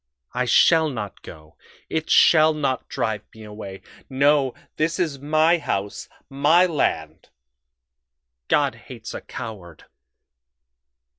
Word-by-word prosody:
I 125 +1 -1
shall 160 +6 +4
not 110 -7 -6
go 75 0 -14 0.3
it 160 0 -3
shall 155 -1 +5
not 135 -4 -2
drive 110 -2 -2
me 110 - -12
away. 105 -2 -9 0.3
No, 140 0 +2 0.2
this 160 +2 0
is 160 -7 -2
my 155 +4 +2
house, 100 -8 -4 0.2
my 150 +6 +3
land. 80 - -2 1.2
God - - +2 0.2
hates - - -8
a - - -6
coward.... 95 -8 -9
135 Hz, 115 wpm, -22 LUFS, 105-155 Hz, 1.2 s, shall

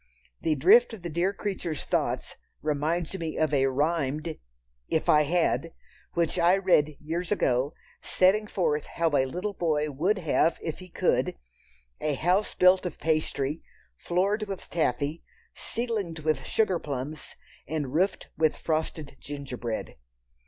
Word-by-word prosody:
The 160 -2 +1
drift 230 - +5
of 190 - -15
the 170 - -4
dear 175 +5 +1
creatures' 190 -6 -3
thoughts - - -1 0.3
reminds 155 +4 -1
me 160 -2 -4
of 155 -2 +1
a 135 -1 +4
rhymed—"If 130 - -2
I 150 - +6
had!" 165 +1 +1 0.4
which 170 +1 +1
I 175 +3 +5
read 155 -6 +3
years 170 +4 -3
ago, 135 -6 +1 0.3
setting 205 +3 +3
forth 150 -7 0
how 165 -1 0
a 135 -1 +3
little 180 +9 -3
boy 155 -4 0
would 180 +10 +1
have 165 -1 +2
if 160 - -5
he 185 0 -11
could, - - +1 0.6
a 150 -2 0
house 180 +8 +1
built 185 0 +5
of - - -7
pastry, 155 -2 0 0.3
floored 200 - 0
with 195 -2 -7
taffy, 150 0 0 0.3
ceiled 220 -8 -3
with 155 -4 0
sugar 195 -6 +1
plums, 145 +2 -6 0.3
and 145 -4 -3
roofed 185 +4 0
with 155 -1 +2
frosted 155 -3 -2
gingerbread. 130 -5 -5
160 Hz, 140 wpm, -27 LUFS, 145-180 Hz, 0.6 s, I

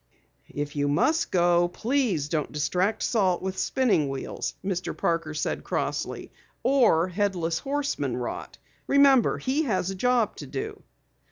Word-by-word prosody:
"If 145 0 -5
you 145 0 +1
must 310 - +2
go, 175 -1 +3
please 215 - 0
don't 150 -1 -2
distract 180 +8 0
Salt 190 -7 +1
with 190 0 -3
spinning 225 - +2
wheels," 135 -1 -4
Mr. 185 -2 -3
Parker 165 -2 -1
said - - -2
crossly. - - -3 0.3
"Or 235 -10 +4
Headless 180 -4 -1
Horseman 285 +1 -2
rot. - - -5 0.3
Remember, 275 -4 +5
he 270 +4 0
has 195 -6 0
a - - -5
job 240 +1 +1
to - - -8
do." 420 +1 -5
190 Hz, 140 wpm, -26 LUFS, 165-255 Hz, 0.3 s, Remember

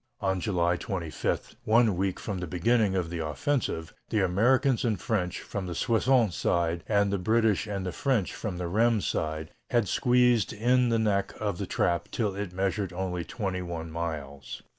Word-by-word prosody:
On 95 -1 0
July 85 -4 +1
25, 85 -5 -3
one 110 -2 +4
week 95 +1 -1
from 100 -3 -4
the 90 - -4
beginning 100 +4 +2
of 85 -3 -1
the 85 -2 -2
offensive, 80 - -2 0.2
the 105 -3 +2
Americans 125 +8 +3
and 110 -6 0
French 90 -5 -1
from 95 -2 -5
the 90 - -4
Soissons 115 0 +2
side 85 -1 0
and 100 -1 +2
the 100 - 0
British 110 +1 +2
and 95 -3 -3
French 125 -9 0
from 100 -6 -4
the 90 - -3
Rheims 110 +3 +2
side 80 +1 -2 0.2
had 120 -4 +2
squeezed 125 0 +3
in 125 +3 +3
the 115 - +2
neck 100 -3 0
of 100 -4 -2
the - - -3
trap 85 +1 0
till 105 -5 -1
it 100 -2 -4
measured 95 +1 -1
only 90 -1 -3
twenty 95 -2 -3
one 85 -2 -5
miles. 75 -5 -5
95 Hz, 175 wpm, -28 LUFS, 85-110 Hz, 0.2 s, one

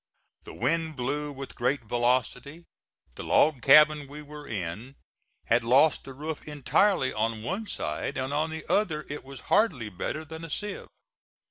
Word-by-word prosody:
The - - -10
wind 160 +5 0
blew 145 +3 -2
with 135 -1 -8
great 125 +2 0
velocity. 125 +7 -1 0.5
The - - -8
log 150 -5 +3
cabin 150 +1 +6
we 150 +2 -9
were 150 0 -10
in 105 +6 -5 0.5
had 115 +1 +2
lost 135 +6 +4
the 135 - -8
roof 155 +2 -5
entirely 150 +2 +2
on 110 0 -1
one 195 - -3
side, 140 - -4
and 130 +2 -2
on 155 +2 0
the 160 -1 -7
other 165 -8 +1
it 145 - -6
was 135 -1 -10
hardly 150 - +2
better 130 - -4
then 160 +1 -9
a 165 - -7
sieve. 205 +6 -5
145 Hz, 160 wpm, -27 LUFS, 125-155 Hz, 0.5 s, cabin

